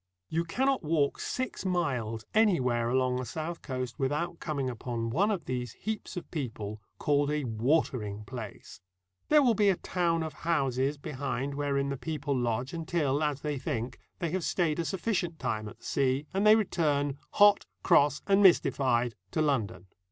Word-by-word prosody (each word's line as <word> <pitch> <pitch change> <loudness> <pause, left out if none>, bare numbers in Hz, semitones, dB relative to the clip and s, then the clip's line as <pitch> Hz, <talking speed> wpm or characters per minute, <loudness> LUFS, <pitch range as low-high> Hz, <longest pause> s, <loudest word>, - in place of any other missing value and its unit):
You 165 +1 0
cannot 265 +9 +1
walk 150 -3 +1
six 255 0 -3
miles 125 - -1
anywhere 130 - +3
along 130 0 +2
the 130 - -2
south 160 +7 -5
coast 130 -2 -4
without 150 +6 -1
coming 145 -4 -2
upon 115 -1 -3
one 195 - +2
of 190 -7 -2
these 125 -2 -3
heaps 215 -3 -5
of 180 - -7
people, 110 -8 -4 0.2
called 145 -1 +2
a 150 0 0
watering 115 -3 0
place. 110 -5 -9 0.5
There 300 -1 +6
will 245 -3 +4
be 205 -1 +3
a 190 - +3
town 170 -2 0
of 160 - -5
houses 135 -4 +1
behind 140 -2 -3
wherein 140 -1 0
the 140 - -2
people 145 -1 -2
lodge, 120 +1 -1
until, 160 -4 0
as 150 -2 0
they 150 -2 -2
think, 125 -1 -3 0.2
they 170 -4 -2
have 185 0 -1
stayed 165 -3 0
a 170 - 0
sufficient 180 -3 -1
time 110 -6 -2
at - - -13
the - - -18
sea, 135 +1 +1
and 195 +2 +2
they 215 - +9
return, 145 -9 0
hot, 205 0 +5 0.2
cross, 145 0 +4
and 200 0 +4
mystified, 130 - +4 0.2
to - - -2
London. 115 - -1
145 Hz, 170 wpm, -29 LUFS, 125-170 Hz, 0.5 s, they